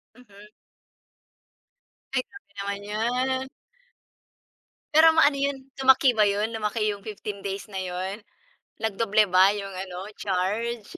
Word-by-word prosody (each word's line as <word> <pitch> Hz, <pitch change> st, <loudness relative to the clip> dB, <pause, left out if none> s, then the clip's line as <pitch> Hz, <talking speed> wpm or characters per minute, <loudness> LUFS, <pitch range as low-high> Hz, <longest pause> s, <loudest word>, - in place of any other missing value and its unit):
Mhm. 210 Hz, -4 st, -16 dB, 1.7 s
Ay, 260 Hz, -, +2 dB
grabe 400 Hz, -, -16 dB
naman 200 Hz, 0 st, -3 dB
'yan. 250 Hz, +5 st, -1 dB, 1.5 s
Pero 315 Hz, +2 st, +7 dB
maano 290 Hz, -3 st, +5 dB
'yon 280 Hz, 0 st, 0 dB, 0.2 s
lumaki 265 Hz, 0 st, +5 dB
ba 210 Hz, -, +5 dB
yun 205 Hz, +2 st, 0 dB
lumaki 215 Hz, +1 st, -2 dB
yung 200 Hz, -1 st, -8 dB
15 210 Hz, -1 st, -6 dB
days 195 Hz, 0 st, -4 dB
na 190 Hz, -, -2 dB
'yon, 185 Hz, +3 st, -4 dB, 0.6 s
nag-doble 215 Hz, 0 st, +2 dB
ba 185 Hz, +1 st, +6 dB
yung 195 Hz, -1 st, -6 dB
ano 185 Hz, 0 st, -7 dB
charge? 210 Hz, +4 st, -2 dB
210 Hz, 120 wpm, -25 LUFS, 200-250 Hz, 1.7 s, Pero